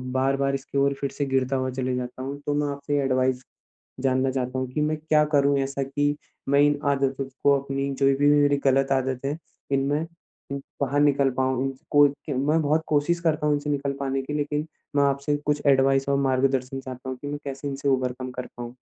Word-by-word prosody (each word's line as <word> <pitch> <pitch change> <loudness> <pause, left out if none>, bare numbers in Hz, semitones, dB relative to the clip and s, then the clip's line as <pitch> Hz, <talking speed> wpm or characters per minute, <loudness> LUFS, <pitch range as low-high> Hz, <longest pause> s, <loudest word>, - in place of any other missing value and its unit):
बार-बार 135 +1 +1
इसकी 135 +1 -5
ओर 140 0 +3
फिर 140 - -1
से 145 - -2
गिरता 135 0 0
हुआ 130 0 0
चले 130 0 -2
जाता 125 0 -5
हूँ? 140 +1 -4
तो 145 - 0
मैं 145 0 0
आपसे 140 +1 -2
एडवाइस 130 -1 +1 0.6
जानना 130 0 +1
चाहता 130 0 -2
हूँ 130 - -2
कि 150 - -1
मैं 155 +1 0
क्या 155 0 +3
करूँ 140 0 +4
ऐसा 135 0 -1
की, 145 +2 0 0.3
मैं 140 0 +4
इन 145 0 +3
आदतों 135 -1 0 0.2
को 140 -1 +5
अपनी 140 0 -3
जो 135 - +1
भी 145 +1 +3
मे 145 - +5
मेरी 145 0 +3
गलत 135 0 +3
आदत 130 0 0
हैं, 145 +3 -1 0.3
इनमे 140 +2 +1 0.5
उह 140 - -2 0.2
बाहर 140 +1 +1
निकल 140 -2 +4
पाऊँ 130 0 +1
इन 135 - -1 0.2
को, 145 0 +7
कि 145 +1 -7
मैं 150 +5 +2
बहुत 155 +2 +1
कोशिश 155 +3 +1
करता 155 -3 0
हूँ 150 - +3
इनसे 145 +1 -3
निकल 140 -1 -1
पाने 135 -1 -1
की 145 +3 -6
लेकिन, 150 +1 -2 0.3
मैं 140 - +4
आपसे 140 +1 +1
कुछ 150 0 +1
एडवाइस 135 0 +4
और 140 - +3
मार्गदर्शन 135 0 +1
चाहता 130 0 -8
हूँ 130 - -4
कि 145 - -6
मैं 145 0 -3
कैसे 140 +1 -5
इनसे 140 0 -2
ओवरकम 130 -1 -1
कर 125 0 -6
पाऊँ? 120 +1 -7
140 Hz, 215 wpm, -25 LUFS, 130-145 Hz, 0.6 s, को